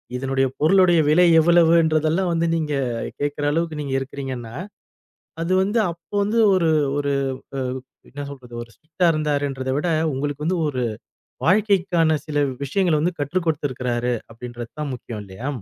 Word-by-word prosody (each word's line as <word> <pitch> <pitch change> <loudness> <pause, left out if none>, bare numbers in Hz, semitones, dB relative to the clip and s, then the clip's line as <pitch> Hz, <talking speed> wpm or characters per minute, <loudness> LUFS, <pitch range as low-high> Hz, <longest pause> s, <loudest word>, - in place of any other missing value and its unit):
இதனுடைய 135 +1 0
பொருளுடைய 175 +1 +5
விலை 175 +4 +5
எவ்வளவுன்றதெல்லாம் 165 +1 +3
வந்து 165 0 +1
நீங்கக் 140 -7 -2
கேக்குற 145 0 -1
அளவுக்கு 165 0 -1
நீங்க 140 -2 -4
இருக்கிறீங்கன்னா, 130 -4 -6 0.9
அது 170 +2 -1
வந்து 205 +4 0
அப்ப 170 -1 -13
வந்து 210 +3 0 0.2
ஒரு 170 -3 +2 0.3
ஒரு 140 -1 0 1.0
என்ன 145 +1 -6
சொல்றது 125 -4 -11
ஒரு 115 - -12
ஸ்ட்ரிக்டா 165 +3 -2
இருந்தார்ன்றதை 145 -3 -1
விட 175 - -1 0.3
உங்களுக்கு 145 +2 -3
வந்து 180 +1 +1
ஒரு 130 -4 -2 0.6
வாழ்க்கைக்கான 180 -4 +3
சில 145 -1 +1 0.2
விஷயங்களை 170 +3 +1
வந்து 170 +3 -1
கற்றுக் 165 +5 -1
கொடுத்திருக்காரு 125 -5 -1 0.2
அப்படின்றது 120 0 -8
தான் 145 -3 -3
முக்கியம் 115 -3 -7
இல்லையா? 100 +8 -7
150 Hz, 135 wpm, -22 LUFS, 135-170 Hz, 1.0 s, பொருளுடைய